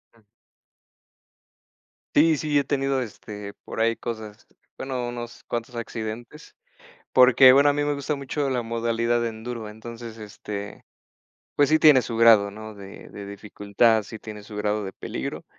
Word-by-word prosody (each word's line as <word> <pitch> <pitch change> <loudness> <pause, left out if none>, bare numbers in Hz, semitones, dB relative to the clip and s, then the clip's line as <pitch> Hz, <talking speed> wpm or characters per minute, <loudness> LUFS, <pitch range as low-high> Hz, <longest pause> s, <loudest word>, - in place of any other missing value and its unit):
Uh. - - -23 2.0
Sí, 160 +2 +5
sí, 150 0 0
he 140 - +3
tenido 135 -1 0
este, 105 -3 -8
por - - -7
ahí 115 +1 +2
cosas, 110 -3 -7 0.3
bueno, 130 -2 -3
unos 120 -1 -7
cuantos 120 +1 -5
accidentes 115 +5 -7 0.6
porque 130 0 +7
bueno, 140 +2 +6
a - - +3
mí 145 0 0
me 145 0 0
gusta 145 +1 -2
mucho 140 +1 -2
la 125 -2 -1
modalidad 115 +1 0
en 110 -1 -8
Durban, 115 -3 -6
entonces, 115 0 -9
este, 105 -1 -8 0.7
pues 145 -1 +3
sí 155 - +4
tiene 150 -5 +7
su 115 - -5
grado, 110 -3 +6
¿no? 110 +1 -9
de 100 -1 -11
de 100 - -9
dificultad, 105 +2 +1
sí 110 +2 -9
tiene 105 -1 -9
su 105 0 -10
grado 105 0 -1
de 95 - -6
peligro, - - -6
115 Hz, 160 wpm, -24 LUFS, 110-130 Hz, 2.0 s, porque